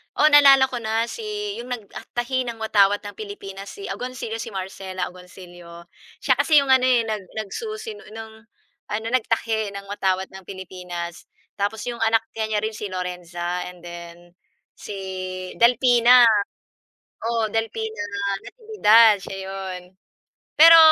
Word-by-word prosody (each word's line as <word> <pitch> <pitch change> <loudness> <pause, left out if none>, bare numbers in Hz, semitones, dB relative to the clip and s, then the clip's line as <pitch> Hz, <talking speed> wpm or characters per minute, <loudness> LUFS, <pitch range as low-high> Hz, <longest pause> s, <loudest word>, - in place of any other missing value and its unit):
Oh, 305 - +5
naalala 275 -2 +8
ko 245 - -3
na 225 0 0
si 420 - -5
yung 240 - -7
nagtahi 245 +3 -3
ng 230 -1 -5
watawat 205 -1 +3
ng 205 - -6
Pilipinas 200 -2 -8
si 400 -1 -8
Agoncillo, 250 -3 -5
si 230 - -6
Marcela 185 -1 -4
Agoncillo. 175 -1 -13 0.4
Siya - - +4
kasi 305 -3 +5
yung 265 - 0
ano, 260 -1 +5
nag 225 -5 +1 0.2
nagsusi 430 - -6
ng 220 +1 -10 0.6
ano, 220 - -4
nagtahi 225 -3 0
ng 200 - -6
watawat 190 -1 -1
ng 190 0 -11
Pilipinas 180 -2 -7 0.3
tapos 205 +2 -1
yung 235 - -8
anak 225 0 +3
niya 220 -1 -1
niya 210 - +2
rin 220 - -1
si 210 - -6
Lorenza 180 -1 -4
and 180 -1 -15
then 175 0 -10 0.5
si - - -7 0.7
Delfina, 245 +1 +6 1.1
oo, 230 -2 0
Delfina 220 -1 -3 0.4
Natividad 230 - +4
siya 195 - -7
yun. 190 -2 -6 0.8
Pero, 330 +1 +10
220 Hz, 135 wpm, -23 LUFS, 190-245 Hz, 1.1 s, Pero